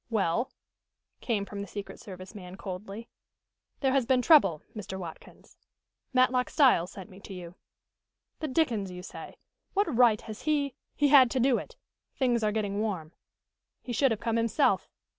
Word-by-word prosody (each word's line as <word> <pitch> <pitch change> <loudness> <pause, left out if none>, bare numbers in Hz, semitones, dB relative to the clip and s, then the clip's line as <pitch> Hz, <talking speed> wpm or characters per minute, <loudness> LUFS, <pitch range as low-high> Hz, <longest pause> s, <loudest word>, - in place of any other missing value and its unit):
"Well?" 220 +1 0 0.7
came 210 -5 -1
from 200 0 -6
the 200 - -6
secret 205 +1 -7
service 185 0 -10
man 185 -3 -9
coldly. 195 +4 -7 0.7
"There 265 -2 +2
has 265 -3 +2
been 255 -1 +3
trouble, 195 - +5
Mr. 190 -3 -6
Watkins. 170 -4 -11 0.5
Matlock 255 0 +3
Styles 250 - +4
sent 190 -2 -9
me 190 - -13
to 200 -1 -9
you." 175 -1 -8 0.9
"The 310 - -2
dickens 245 - 0
you 180 0 -8
say. - - -9 0.4
What 400 - +1
right 230 -3 +5
has 215 -2 -8
he 290 -3 0
" - - -53
"He 290 -1 +3
had 270 -3 +8
to 260 - -1
do 250 0 +3
it. 485 - -10 0.4
Things 245 -4 +1
are 210 - +2
getting 205 -2 -1
warm." 185 -8 -3 0.7
"He 245 - -5
should 270 +3 +3
have 225 -3 -1
come 230 -1 -1
himself." 230 +5 +2
225 Hz, 170 wpm, -29 LUFS, 195-260 Hz, 0.9 s, had